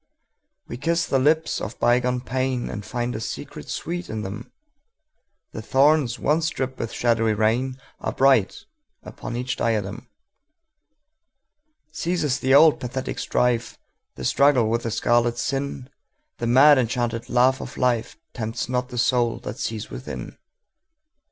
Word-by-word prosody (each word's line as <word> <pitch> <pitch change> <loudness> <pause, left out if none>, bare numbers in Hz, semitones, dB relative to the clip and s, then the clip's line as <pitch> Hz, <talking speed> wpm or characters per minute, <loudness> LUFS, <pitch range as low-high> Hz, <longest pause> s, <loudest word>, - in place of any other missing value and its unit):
We 120 - -6
kiss 165 +5 0
the 135 - +1
lips 155 +4 +1
of 110 - -6
bygone 125 +1 +2
painAnd 125 -4 -2
find 120 0 -3
a - - -3
secret 110 - -7
sweet 175 +2 -4
in 110 -1 -4
them:The 285 - -12
thorns 135 -2 +3
once 160 +2 +1
dripped 130 -2 -4
with 115 - -3
shadowy 115 -2 +1
rainAre 125 +5 -2
bright 130 -7 +3 0.4
upon 120 - -7
each 125 +1 -3
diadem. 110 0 -2 1.8
Ceases 155 -4 -1
the 130 +1 +3
old 155 +1 +6
pathetic 130 +1 -4
strife, 120 -1 0 0.4
The - - -6
struggle 135 -6 +3
with 115 +1 +1
the 115 - -3
scarlet 120 +1 +1
sin:The 140 - -5
mad 135 +4 +7
enchanted 120 -1 -2
laugh 130 +2 +3
of - - -8
lifeTempts 120 -1 -2
not 125 0 -1
the 125 - -7
soul 120 -1 +2
that 110 - -7
sees 110 -1 -4
within. 130 - -7
125 Hz, 125 wpm, -23 LUFS, 115-140 Hz, 1.8 s, mad